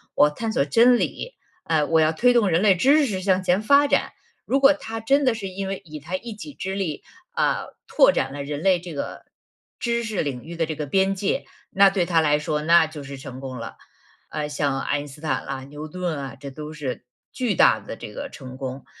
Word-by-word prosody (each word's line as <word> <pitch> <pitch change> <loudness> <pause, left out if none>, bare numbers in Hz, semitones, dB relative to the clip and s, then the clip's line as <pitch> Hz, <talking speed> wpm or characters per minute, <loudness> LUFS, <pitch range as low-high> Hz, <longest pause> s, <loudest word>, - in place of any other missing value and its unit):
我 150 - +6
探 220 +9 -4
索 140 - +1
真 235 - +5
理， - - -3 0.3
呃， 155 -2 +1
我 160 +1 +3
要 155 +1 +4
推 245 +9 +3
动 220 -5 +3
人 165 +2 +2
类 200 -3 +5
知 280 - +4
识 190 -6 -3
向 190 -1 +2
前 185 +3 +2
发 285 +5 +5
展。” - - +1 0.3
如 275 - +2
果 275 +1 +7
他 225 -6 -6
真 275 +6 +2
的 250 - +4
是 200 -3 -5
因 190 +1 -5
为 195 0 -4
以 155 -1 -8
他 170 +5 -4
一 230 +1 -8
己 280 +7 -9
之 190 -5 -4
力， 175 -7 -3 0.3
啊， - - 0 0.2
拓 - - +5
展 - - -1
了 140 -1 -5
人 145 +1 -4
类 185 -2 +4
这 175 -3 -8
个 140 - -6 0.5
知 235 -1 0
识 215 -3 -2
领 130 -4 -4
域 170 +1 -8
的 165 - +1
这 160 - -4
个 150 -1 -4
边 195 +5 +2
界， 195 +1 -1 0.2
那 195 0 +6
对 185 -3 +1
他 165 -2 +3
来 150 -1 +3
说 150 0 -2
那 165 0 +5
就 155 -2 -9
是 140 0 -8
成 130 -1 -9
功 130 -2 -6
了。 - - -8 0.5
呃， 150 -1 -3
像 140 -2 -1
爱 145 - 0
因 145 - -8
斯 145 +2 -13
坦 135 -5 -2
啊、 135 -1 -4
牛 150 +2 -8
顿 175 -1 -3
啊， 135 0 -6
这 140 -1 -7
都 150 +3 -8
是 135 -4 -5 0.3
巨 245 -5 -1
大 - - +5
的 - - -8
这 - - -9
个 - - -5
成 130 0 -10
功。 130 0 -6
165 Hz, 255 characters per minute, -23 LUFS, 145-210 Hz, 0.5 s, 果